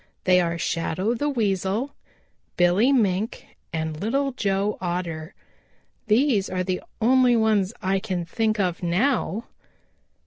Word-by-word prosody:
They 180 -1 +5
are 170 -1 -1
Shadow 170 +6 -1
the 290 +5 -1
Weasel, 215 +1 -1 0.6
Billy 180 +9 +4
Mink 215 -4 0 0.3
and 160 -1 -3
Little 275 +6 0
Joe 200 -4 -1
Otter. 170 -3 -4 0.7
These 220 -2 +3
are 185 0 -1
the 185 0 -2 0.2
only 250 +1 +4
ones 215 -4 +2
I 190 +1 +1
can 185 -4 -3
think 215 +4 -1
of 180 -3 0
now." 215 +4 0
195 Hz, 125 wpm, -24 LUFS, 180-230 Hz, 0.7 s, They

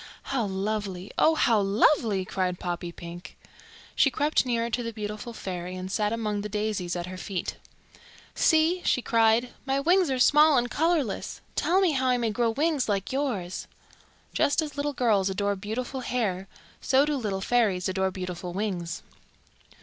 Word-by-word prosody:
"How 245 -5 +1
lovely! 195 -1 -3
Oh, 320 - +5
how 230 -7 +3
lovely!" 200 0 +2
cried 185 -1 -1
Poppypink. 175 0 -6 0.6
She 275 - +4
crept 290 +1 +1
nearer 235 -1 0
to 245 - 0
the 230 -1 -4
beautiful 215 +2 -6
fairy 180 -4 -5
and 185 +1 -6
sat 210 0 0
among 215 -3 -2
the 210 - -5
daisies 210 -4 -2
at 175 -1 -3
her 185 +1 -7
feet. 190 -2 -4 0.8
"See," 325 +3 +3
she 250 - +1
cried. 230 +1 +3
"My 270 +1 0
wings 350 +3 +3
are 260 - 0
small 300 +3 +6
and 245 0 0
colourless. 315 - 0
Tell 365 +2 +2
me 370 -4 +3
how 260 -3 0
I 250 -1 +3
may 230 -2 0
grow 235 +2 +1
wings 290 +1 0
like 200 -2 -1
yours." 220 -11 -2 0.7
Just 285 - +2
as 305 -3 -2
little 290 0 -2
girls 215 -7 +2
adore 200 +1 0
beautiful 225 +7 -4
hair, 205 -7 -2 0.3
so 270 +2 +3
do 300 0 0
little 210 -7 -2
fairies 205 -5 +1
adore 190 0 0
beautiful 180 -1 -6
wings. 180 -4 -3
220 Hz, 165 wpm, -27 LUFS, 190-265 Hz, 0.8 s, small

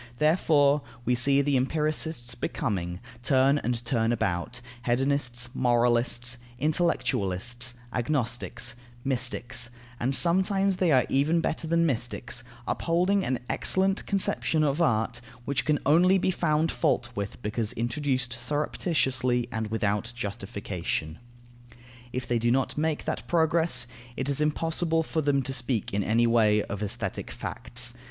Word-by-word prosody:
Therefore, 150 -2 +3 0.2
we 125 - +2
see 140 +3 +4
the 145 0 +1
empiricists 150 -1 -1
becoming, 95 - -3 0.2
turn 135 +3 +4
and 120 -2 -2
turn 115 -2 +1
about, 105 +1 -1 0.2
hedonists, 125 -1 0
moralists, 120 0 +1 0.2
intellectualists, 125 - 0 0.2
agnostics, 125 -1 -1 0.3
mystics, 120 -3 0 0.3
and 130 +3 0
sometimes 190 +3 +2
they 180 -3 +2
are 130 -3 +5
even 150 +5 +2
better 165 0 -2
than 170 +1 +3
mystics, 120 -4 -2 0.2
upholding 180 +4 +1
an 130 -1 -1
excellent 190 +1 +1
conception 185 -5 +1
of 145 +2 +1
art, 120 -4 +1 0.2
which 140 0 -1
can 150 -1 +3
only 180 +6 +5
be 185 0 +1
found 160 -2 +1
fault 120 0 0
with 100 -3 -5
because 105 +1 -1
introduced 125 +1 -1
surreptitiously 130 -2 0
and 110 -1 -2
without 105 +1 -1
justification. 95 -6 -4 0.9
If 125 0 -3
they 120 -1 +1
do 120 +1 +1
not 130 +2 +1
make 155 0 -1
that - - -3
progress, 160 -6 +3 0.3
it 130 +1 -2
is 140 +1 +1
impossible 165 +2 +1
for 160 0 -1
them 140 -2 +1
to 135 - -3
speak 125 -6 -2
in 100 0 +1
any 115 +4 +3
way 110 -3 +4
of 100 - -6
aesthetic 105 - -3
facts. - - -2
130 Hz, 130 wpm, -27 LUFS, 120-155 Hz, 0.9 s, are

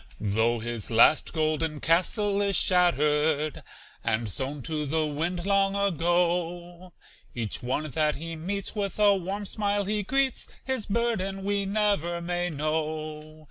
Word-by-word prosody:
Though 110 +3 +1
his 115 -1 -4
last 115 +6 +5
golden 155 -1 -1
castle 200 +5 +2
is 200 -1 +1
shattered 155 -4 +2 0.4
And 110 0 0
sown 135 +7 -2
to 150 0 -3
the 155 +2 +1
wind 170 +4 -2
long 195 0 +2
ago, 175 -1 0 0.4
Each 115 -3 -3
one 130 +5 -2
that 155 +1 +1
he 165 +2 -6
meets 195 +5 -3
with 200 -2 -3
a 205 -1 +5
warm 195 +2 -4
smile 205 0 -1
he 210 +1 0
greets, 265 +5 0 0.2
His 260 -4 -2
burden 200 -4 -1
we 200 0 0
never 200 -5 0
may 175 +1 -2
know. 155 0 -3
170 Hz, 140 wpm, -27 LUFS, 150-200 Hz, 0.4 s, last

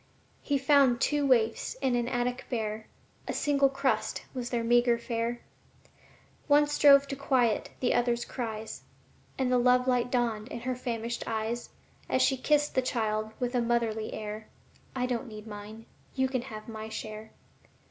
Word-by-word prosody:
He 285 - 0
found 270 -3 +4
two 290 0 +1
waifs 235 - +2
in 265 - 0
an 240 -1 0
attic 245 0 -2
bare; 220 -2 -3 0.4
A - - -2
single 280 -2 +2
crust 270 0 -1
was 245 -2 -4
their 240 -2 -1
meagre 240 0 +4
fare 235 0 -3 1.1
One 295 0 +5
strove 285 -1 +6
to 275 - -2
quiet 255 -5 +1
the 250 - +2
other's 240 0 +1
cries, 220 -3 -5 0.6
And 260 -1 0
the 250 - +4
love 250 +1 +4
light 250 -1 +2
dawned 235 -3 0
in 235 - -7
her 255 +1 -1
famished 235 -1 -3
eyes 225 +2 -2 0.4
As - - +3
she 270 - +3
kissed 295 +3 +1
the 260 - +2
child 220 -3 -1
with 245 0 -1
a 245 - +2
motherly 230 -2 0
air: 215 0 -6 0.5
"I 250 -1 0
don't 250 0 -2
need 215 -1 -9
mine, 215 +1 -9 0.3
you 265 -1 +2
can 260 -2 -1
have 215 -2 -9
my 220 -1 -7
share." 215 0 -7
240 Hz, 165 wpm, -29 LUFS, 220-260 Hz, 1.1 s, strove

